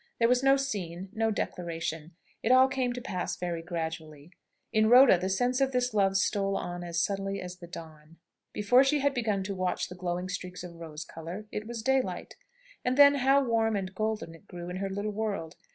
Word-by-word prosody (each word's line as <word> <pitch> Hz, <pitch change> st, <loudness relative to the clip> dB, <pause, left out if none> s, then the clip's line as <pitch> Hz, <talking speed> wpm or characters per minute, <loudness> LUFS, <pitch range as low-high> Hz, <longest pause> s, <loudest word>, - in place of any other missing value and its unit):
There 230 Hz, -, +4 dB
was 250 Hz, +1 st, +3 dB
no 270 Hz, 0 st, +5 dB
scene, 190 Hz, -9 st, -4 dB
no 225 Hz, 0 st, +1 dB
declaration. 165 Hz, -5 st, -4 dB, 0.3 s
It -, -, +1 dB
all 260 Hz, +1 st, +7 dB
came 260 Hz, -2 st, -1 dB
to 245 Hz, -, -6 dB
pass 190 Hz, -8 st, -3 dB
very 175 Hz, -2 st, -3 dB
gradually. 160 Hz, -2 st, -6 dB, 0.4 s
In 215 Hz, 0 st, +4 dB
Rhoda 250 Hz, -2 st, +8 dB
the 185 Hz, +1 st, -2 dB
sense 245 Hz, +7 st, +1 dB
of 270 Hz, -1 st, +2 dB
this 250 Hz, -1 st, 0 dB
love 195 Hz, -2 st, +3 dB
stole 195 Hz, -1 st, +1 dB
on 175 Hz, 0 st, -5 dB
as 170 Hz, -1 st, -2 dB
subtly 195 Hz, +2 st, -1 dB
as 180 Hz, 0 st, -7 dB
the 175 Hz, -, -11 dB
dawn. 160 Hz, -2 st, -11 dB, 0.3 s
Before 245 Hz, +6 st, +4 dB
she 275 Hz, +2 st, +2 dB
had 280 Hz, 0 st, +2 dB
begun 215 Hz, -6 st, 0 dB
to 200 Hz, +1 st, -3 dB
watch 185 Hz, -1 st, -2 dB
the 180 Hz, -, -8 dB
glowing 180 Hz, 0 st, -3 dB
streaks 180 Hz, -1 st, -6 dB
of 175 Hz, -1 st, -8 dB
rose 160 Hz, -2 st, -8 dB
colour, 170 Hz, +7 st, -8 dB
it 210 Hz, +1 st, -5 dB
was 230 Hz, -2 st, -5 dB
daylight! 265 Hz, +1 st, 0 dB, 0.5 s
And 250 Hz, +1 st, 0 dB
then 285 Hz, 0 st, +9 dB
how 275 Hz, +1 st, +3 dB
warm 225 Hz, -3 st, +1 dB
and 190 Hz, -1 st, -3 dB
golden 215 Hz, -3 st, -2 dB
it 165 Hz, +5 st, -17 dB
grew 175 Hz, -1 st, -7 dB
in 180 Hz, -, -4 dB
her 195 Hz, +1 st, -2 dB
little 205 Hz, +2 st, -3 dB
world! 205 Hz, -6 st, -3 dB
195 Hz, 205 wpm, -29 LUFS, 175-240 Hz, 0.5 s, then